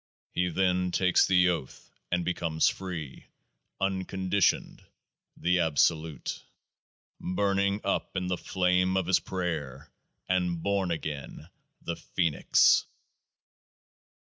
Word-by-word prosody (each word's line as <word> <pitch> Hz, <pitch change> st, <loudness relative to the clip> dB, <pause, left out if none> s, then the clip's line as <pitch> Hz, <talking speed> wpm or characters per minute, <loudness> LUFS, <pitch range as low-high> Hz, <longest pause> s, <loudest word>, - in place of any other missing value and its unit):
He 90 Hz, 0 st, 0 dB
then 90 Hz, +1 st, +1 dB
takes 90 Hz, 0 st, +3 dB
the 90 Hz, -2 st, +4 dB
Oath 80 Hz, -7 st, -5 dB, 0.2 s
and 90 Hz, -1 st, 0 dB
becomes 85 Hz, -2 st, +1 dB
free 85 Hz, -7 st, -5 dB, 0.3 s
— -, -, -53 dB
unconditioned 95 Hz, 0 st, 0 dB, 0.3 s
— -, -, -64 dB
the 90 Hz, +1 st, +1 dB
Absolute. 80 Hz, 0 st, 0 dB, 0.8 s
Burning 100 Hz, +2 st, 0 dB
up 100 Hz, -1 st, -2 dB
in 90 Hz, -, -1 dB
the 90 Hz, 0 st, 0 dB
Flame 90 Hz, +1 st, +1 dB
of 95 Hz, -, 0 dB
his 95 Hz, +1 st, +3 dB
Prayer, 80 Hz, -8 st, -4 dB, 0.4 s
and 90 Hz, -2 st, 0 dB
born 100 Hz, -2 st, 0 dB
again 80 Hz, -1 st, -5 dB, 0.2 s
— -, -, -50 dB
the 85 Hz, -, -4 dB
Phoenix 85 Hz, -5 st, +3 dB
90 Hz, 115 wpm, -28 LUFS, 85-95 Hz, 0.8 s, the